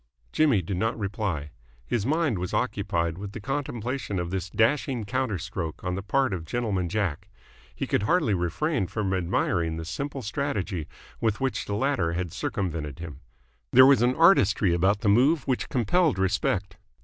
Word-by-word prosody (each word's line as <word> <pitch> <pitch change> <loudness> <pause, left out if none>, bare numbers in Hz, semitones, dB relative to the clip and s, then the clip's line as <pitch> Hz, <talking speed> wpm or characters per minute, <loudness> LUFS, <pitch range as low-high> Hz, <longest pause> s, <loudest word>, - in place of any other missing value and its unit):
Jimmy 135 -12 +3
did 90 +2 -3
not 115 +4 0
reply. 100 -8 -3 0.3
His 115 - -1
mind 155 - +1
was 90 0 -3
occupied 95 -7 -1
with 100 0 -7
the - - -6
contemplation 130 -3 -3
of 85 -1 -3
this 95 -1 -3
dashing 120 +2 +1
counter 125 -2 -1
stroke 90 -2 -5
on 90 - -2
the 95 - -3
part 130 +3 +1
of 85 -3 -3
Gentleman 95 -1 -1
Jack. 95 -6 -2 0.5
He - - -2
could - - +1
hardly 145 - +2
refrain 95 - 0
from 100 -1 -2
admiring 85 -2 0
the 80 - -5
simple 135 - -4
strategy 105 - -2 0.3
with 110 -2 0
which 135 -1 -1
the 100 - -3
latter 105 -9 0
had 85 -1 -3
circumvented 80 -7 -3
him. 85 -3 -8 0.5
There 130 - +9
was 135 -3 +6
an 125 +1 +3
artistry 100 - +4
about 95 +4 +2
the 115 - -1
move 135 +8 +3
which 130 -2 -1
compelled 145 - +2
respect. 95 -1 0
100 Hz, 170 wpm, -26 LUFS, 90-130 Hz, 0.5 s, There